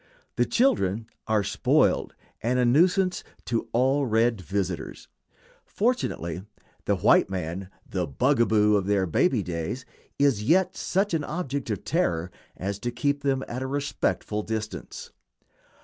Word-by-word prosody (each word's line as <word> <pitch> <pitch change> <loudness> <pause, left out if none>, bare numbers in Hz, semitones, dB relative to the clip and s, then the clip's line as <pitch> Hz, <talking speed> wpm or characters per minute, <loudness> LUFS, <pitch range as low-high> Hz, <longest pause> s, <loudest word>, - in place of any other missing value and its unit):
The - - +2
children 110 - +2 0.2
are 110 -2 +2
spoiled, 100 - +2 0.3
and 125 +3 +1
a 125 - +3
nuisance 180 +8 +3 0.2
to 115 -2 -2
all 135 +3 +2
red 115 -1 +2
visitors. 95 -1 -4 0.6
Fortunately 195 - -1 0.4
the - - +2
white - - +4
man, 90 0 -4 0.2
the 90 -3 -2
"bugaboo" 110 - +3
of 100 -1 -2
their 100 -2 +2
baby 110 - +2
days, 85 +9 -4 0.3
is 140 -7 +3
yet 175 - +2
such 195 +1 0
an 160 -2 +1
object 140 -5 -3
of 105 - -3
terror 90 - 0 0.3
as 100 +1 -3
to 120 - -2
keep 145 +4 -1
them 135 -1 0
at 125 +2 -5
a 130 - -2
respectful 140 -6 -1
distance. 110 0 -5
115 Hz, 135 wpm, -26 LUFS, 100-140 Hz, 0.6 s, white